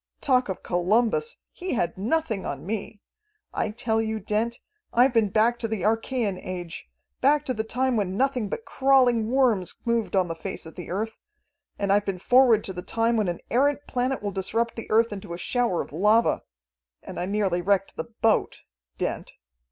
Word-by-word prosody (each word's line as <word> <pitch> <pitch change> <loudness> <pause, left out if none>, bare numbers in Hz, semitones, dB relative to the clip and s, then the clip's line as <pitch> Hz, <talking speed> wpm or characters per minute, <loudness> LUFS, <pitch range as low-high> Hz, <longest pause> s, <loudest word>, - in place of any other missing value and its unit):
Talk 255 -5 +2
of 190 - -4
Columbus! 225 - +1
he 365 +1 -4
had 175 -6 0
nothing 225 0 -1
on - - -5
me. 210 +1 -4 0.5
I - - -1
tell 225 0 0
you, 220 0 -2
Dent, 220 +3 -1 0.3
I've 245 +2 +4
been 225 -3 +3
back 230 +4 +2
to 230 - -2
the 220 -5 -3
Archaean 225 -2 0
Age, 175 - -6 0.3
back 290 +2 +3
to 255 - 0
the 220 -2 -2
time 250 +2 0
when 195 -2 -1
nothing 255 -5 +1
but 450 - -5
crawling 250 -5 +3
worms 240 -8 +2
moved 235 -3 0
on 185 -2 +3
the 165 - -3
face 165 0 -6
of 160 - -10
the 180 - -8
earth. 215 +5 -2 0.7
And 200 -1 +1
I've 205 0 +2
been 195 -2 -2
forward 245 +2 +5
to 190 - -4
the 180 - -5
time 230 +4 0
when 215 -3 +1
an 175 -1 -3
errant 285 +4 +2
planet 255 -1 -1
will 205 - -1
disrupt 225 +5 -1
the 230 - -7
earth 225 0 +3
into 185 -4 -6
a - - -7
shower 235 -1 0
of - - -15
lava 210 +7 +3 0.6
and - - -7
I 180 - -2
nearly 195 -3 0
wrecked 195 +1 +1
the - - -4
boat. 225 -1 0 0.4
Dent. - - -3
220 Hz, 190 wpm, -25 LUFS, 195-245 Hz, 0.7 s, forward